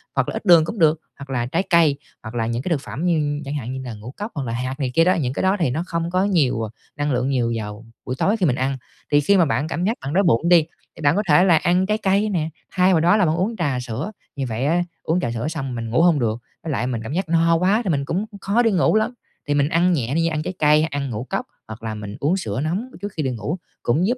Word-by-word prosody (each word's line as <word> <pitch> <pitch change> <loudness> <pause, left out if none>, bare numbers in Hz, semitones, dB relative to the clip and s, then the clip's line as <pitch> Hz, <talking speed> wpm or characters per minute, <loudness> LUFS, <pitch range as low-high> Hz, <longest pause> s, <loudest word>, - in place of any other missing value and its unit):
hoặc - - +1
là - - -4
ít - - -5
đường 170 -4 +7
cũng 210 +4 -5
được, 160 -1 +4 0.2
hoặc 140 -1 -10
là 120 -2 -1
trái 165 +9 0
cây, 165 -5 +4 0.3
hoặc 110 +1 -8
là 115 -1 0
những 120 +1 -2
cái 185 - -3
thực 150 -5 0
phẩm 160 +5 -5
như 150 -4 +1
chẳng 140 - -4
hạn 130 -2 -4
như 130 - -5
là 120 - -5
ngũ 110 +4 -9
cốc 210 +3 -5
hoặc 140 - -2
là 115 - -3
hạt 130 +4 -3
này 130 -3 -1
kia 165 - +5
đó, 180 +2 +4
những 130 -7 -1
cái - - -2
đó 190 +2 +3
thì 160 - +2
nó 155 +7 -2
không 170 0 -2
có 185 +1 +2
nhiều, 150 - +2
ờ, 110 - -3 0.3
năng 145 0 -1
lượng 125 +2 0
nhiều 120 -3 +1
vào 105 +1 -6 0.2
buổi 130 - -3
tối 210 +4 +2
khi 185 - +1
mình 130 -4 +2
ăn. 135 +1 -1 0.3
Thì 145 - +5
khi 200 +7 +4
mà 170 - +5
bạn 145 +2 0
cảm 175 +2 -3
giác 225 +3 0
bạn 135 +2 -4
đói 195 +3 +3
bụng 165 +1 +2
đi, 170 -3 +7 0.3
thì - - -11
bạn 145 +1 +3
có 210 - +1
thể 150 +5 +6
là 170 -4 +5
ăn 180 +4 +2
trái 215 +2 +1
cây 200 +1 +1
nè, 165 -5 -1 0.2
thay 185 0 +3
vào 165 - +4
đó 175 +6 +4
là 195 - +3
bạn 155 0 +1
uống 205 +6 -1
trà 140 -7 0
sữa, 125 - -4 0.2
như 135 -2 -2
vậy 115 +4 -2
á 170 +4 +2 0.2
uống 170 +3 +1
trà 120 - -2
sữa 120 +5 -3
xong 135 -5 -4
mình 115 -1 -4
ngủ 125 +8 +2
hông 170 -4 +4
được, 115 -1 -1 0.2
với 160 - -3
lại 125 -1 -1
mình 120 -3 -2
cảm 115 - -5
giác 180 0 -2
no 165 0 +4
quá 190 +7 +2
thì 195 - -2
mình 140 -4 0
cũng, 190 +8 -1 0.2
khó 220 +5 +2
đi 225 - +3
ngủ 185 +3 +3
lắm. 220 +3 +1 0.3
Thì 145 - +1
mình 145 +1 +2
ăn 175 +2 +3
nhẹ 130 -2 -1
đi, 165 0 +2
ăn 155 -2 -1
trái 185 - -4
cây, 150 +1 +5
ăn 145 -4 -2
ngũ 110 +1 -4
cốc - - -2 0.2
hoặc 110 +1 -9
là 110 -1 -3
mình 105 -1 -7
uống 165 +7 +1
sữa 110 - -3
nóng 180 +10 -1 0.2
trước 205 0 -4
khi 155 - -2
đi 130 - 0
ngủ 145 - -3 0.3
cũng 160 +11 +2
giúp 250 +2 0
155 Hz, 305 wpm, -22 LUFS, 130-180 Hz, 0.3 s, đường